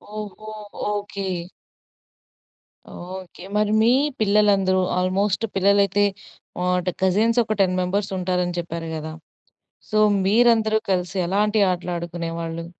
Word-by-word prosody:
ఓహో! 215 +1 -7 0.4
Okay. 205 -1 -4 1.7
Okay. 185 0 -9
మరి 210 0 +1
మీ 230 - +5 0.3
పిల్లలందరూ 200 -3 +3 0.2
ఆల్మోస్ట్ 195 +4 0
పిల్లలైతే 200 +1 +3 0.6
ఆట్ 180 0 +1
కజిన్సొక 215 +4 +2
10 185 -1 +2
మెంబర్సుంటారని 180 -2 -1
చెప్పారు 170 -1 -5
గదా! 155 0 -6 0.8
సో, 215 - 0 0.3
మీరందరూ 220 +1 +4
కలిసి 180 0 -1
ఎలాంటి 210 +3 +1
ఆటలు 180 0 -4
ఆడుకునేవాళ్ళు? 170 -1 -5
190 Hz, 95 wpm, -22 LUFS, 180-210 Hz, 1.7 s, మీ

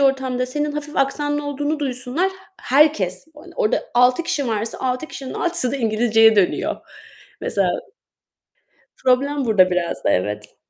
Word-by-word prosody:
ortamda 265 -2 +1
senin 295 +3 -2
hafif 300 +1 -6
aksanlı 290 +2 0
olduğunu 290 +2 -2
duysunlar, 275 +6 -1 0.3
herkes, 250 - +2
hani, 350 +4 -13
orada 215 - +1
6 250 +5 +4
kişi 285 -6 -2
varsa 220 0 -2
6 255 +3 -2
kişinin 270 -4 -8
6'sı 340 -8 0
da - - -1
İngilizceye 225 -2 +3
dönüyor 195 -3 +1 0.6
mesela. 195 -3 0 1.4
Problem 275 +2 +2
burada 195 -6 +4
biraz 180 -1 -2
da - - +3
evet. 105 +3 -2
255 Hz, 135 wpm, -21 LUFS, 220-290 Hz, 1.4 s, 6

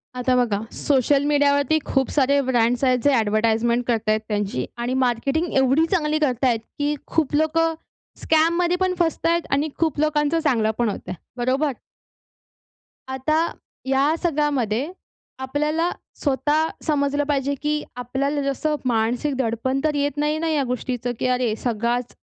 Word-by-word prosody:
आता 250 0 +1
बघा, 230 -5 +1 0.2
सोशल 280 0 +2
मीडियावरती 285 +1 +3
खूप 270 -1 0
सारे 280 0 +3
ब्रँड्स 240 +1 +2
आहेत, 255 -1 +3
जे 285 - +4
ॲडव्हर्टाइजमेंट 225 +3 +1
करत 225 -3 0
आहेत, 215 0 +3
त्यांची 205 - -2
आणि 240 +1 -2
मार्केटिंग, 275 +7 0
एवढी 270 +5 +4
चांगली 310 -4 +1
करत 260 -4 0
आहेत, 235 -3 +2 0.2
की 290 +1 0
खूप 310 -3 0
लोकं 325 +1 +2 0.5
स्कॅममध्ये 340 +2 +2
पण 370 -1 +1
फसत 330 -2 0
आहेत 340 +1 +2
आणि 285 +3 +1
खूप 320 -3 0
लोकांचं 305 +1 +1
चांगलं 235 -9 +1
पण 235 -2 +1
होतं 185 -2 -6
आहे. 180 - -6 0.2
बरोबर? 260 +4 0 1.4
आता 265 +4 0 0.5
या 275 +4 +2
सगळ्यामध्ये 290 - 0 0.5
आपल्याला 300 +5 0 0.3
स्वतः 295 +3 +1 0.2
समजलं 285 -1 +1
पाहिजे, 280 -1 0
की 300 +2 -2
आपल्याला 270 +4 -2
जसं 280 +2 -1
मानसिक 245 +4 0
दडपण 260 +2 -1
तर 305 -1 +1
येत 285 0 -1
नाही 300 +1 0
ना, 330 0 -1
या 300 -3 +1
गोष्टीचं, 245 -1 -3
की - - 0
अरे 250 -3 +1
सगळाच 240 +1 -1
275 Hz, 150 wpm, -22 LUFS, 245-300 Hz, 1.4 s, जे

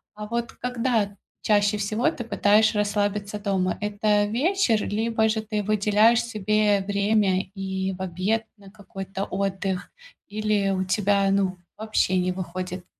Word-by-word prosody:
а 210 0 -6
вот 235 +1 -3
когда 235 -5 -1 0.3
чаще 205 0 +2
всего 215 +8 0
ты 250 -7 -6
пытаешь 215 -1 +3
расслабиться 205 0 -1
дома? 190 -3 -1
Это 210 0 +1
вечер, 245 - +1
либо 220 +1 +1
же 220 0 0
ты 210 -1 -3
выделяешь 215 +3 +3
себе 215 -2 +1
время 200 -2 +2
и 190 -1 -3
в 190 - -10
обед 190 +5 -1
на 195 -1 -15
какой-то 195 -1 -6
отдых, 195 -1 -3 0.4
или 210 -1 0
у 185 -1 0
тебя, 200 0 +2
ну, 195 -1 +1 0.2
вообще 215 -4 +1
не 180 0 +1
выходит? 180 0 -5
205 Hz, 140 wpm, -24 LUFS, 195-215 Hz, 0.4 s, пытаешь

